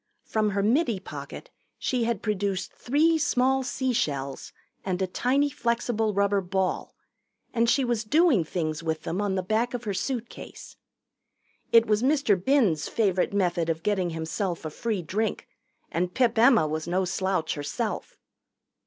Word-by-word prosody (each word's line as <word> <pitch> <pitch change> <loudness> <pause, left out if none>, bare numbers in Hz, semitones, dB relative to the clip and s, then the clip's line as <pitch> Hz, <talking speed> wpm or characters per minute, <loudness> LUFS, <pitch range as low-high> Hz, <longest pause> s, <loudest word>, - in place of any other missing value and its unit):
From 215 -1 0
her 200 0 0
middy 235 - +2
pocket - - -9 0.3
she 245 -3 0
had 230 -3 -2
produced 200 -3 -2
three 315 +5 +2
small 265 -2 +2
sea 260 0 -1
shells 140 - -2 0.3
and 185 -1 -2
a 190 - +1
tiny 270 +9 +1
flexible 235 -3 0
rubber 200 0 +2
ball, 190 0 -2 0.6
and 230 -1 +2
she 270 +1 +3
was 240 -2 0
doing 290 - +4
things 155 -1 -3
with 160 -1 -3
them 185 +5 -2
on 200 -2 0
the 185 - -1
back 225 +6 0
of 245 - -5
her 205 -3 -2
suitcase. 240 +4 -5 1.0
It 230 -1 +7
was 210 -1 +1
Mr. 275 -4 +3
Binns' 190 - +2
favorite 190 -5 +1
method 175 -4 0
of 165 0 -2
getting 190 -3 +1
himself 165 +2 -3
a 155 - -4
free 215 0 -2
drink, 215 +7 -2 0.4
and 180 +1 -1
Pip 245 +2 +2
Emma 230 - +5
was 155 +1 -3
no 185 +2 +1
slouch 185 -2 -1
herself. 145 -1 -4
205 Hz, 155 wpm, -26 LUFS, 180-240 Hz, 1.0 s, It